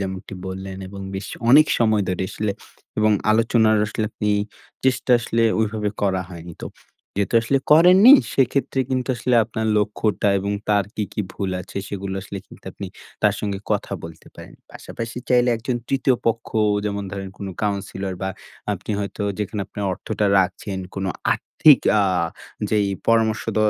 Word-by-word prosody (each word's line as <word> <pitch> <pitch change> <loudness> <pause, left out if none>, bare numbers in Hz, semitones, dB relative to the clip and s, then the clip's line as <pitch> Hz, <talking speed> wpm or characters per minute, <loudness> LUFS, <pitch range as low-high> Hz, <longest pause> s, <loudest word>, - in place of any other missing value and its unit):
যেমনটি 95 0 -5
বললেন 95 0 -6
এবং 100 +1 -9
বেশ 95 - -4 0.2
অনেক 150 +4 +8
সময় 110 -3 +3
ধরে 95 0 -1
আসলে 105 -1 -2 0.5
এবং 110 0 +4 0.2
আলোচনার 110 0 +3
আসলে 105 +1 -2
আপনি 105 - -2 0.5
চেষ্টা 130 -1 +1
আসলে 115 0 0 0.2
ওইভাবে 105 -1 -1
করা 95 -2 +1
হয়নি। 85 -1 -9
তো - - -3 0.5
যেহেতু 100 +2 -1
আসলে 135 +4 +2
করেননি 180 - +8 0.2
সেক্ষেত্রে 135 +1 +1
কিন্তু 130 0 -1
আসলে 125 +1 0
আপনার 110 +1 -3
লক্ষ্যটা 105 0 0
এবং 100 +1 -2 0.2
তার 100 -1 +3
কী, 110 - -2
কী - - -2
ভুল 95 -2 -3
আছে 95 +2 -11
সেগুলো 100 -1 -4
আসলে 100 0 -7
কিন্তু - - -16
আপনি - - -7 0.4
তার 105 -1 +4
সঙ্গে 100 -2 -2
কথা 105 -1 -1
বলতে 80 0 -11
পারেন। - - -12 0.2
পাশাপাশি 115 +1 -7
চাইলে 125 0 +4
একজন 120 +2 -2
৩য় 135 -1 +2
পক্ষ 115 0 0 0.4
যেমন 100 -1 -2
ধরেন 95 -1 -5
কোনো 100 -1 -5
কাউন্সিলর 100 -2 -2
বা 95 - -1 0.4
আপনি 100 +2 -6
হয়তো 100 +1 -4 0.2
যেখানে 105 0 -3
আপনার 100 +1 -5
অর্থটা 105 +3 -2
রাখছেন 95 +1 -1 0.2
কোনো 95 0 -2 0.2
আর্থিক 150 -5 +5 0.2
আ - - +4 0.7
যেই 105 -2 +2 0.2
পরামর্শদ 110 -2 +2
105 Hz, 155 wpm, -22 LUFS, 100-115 Hz, 0.7 s, অনেক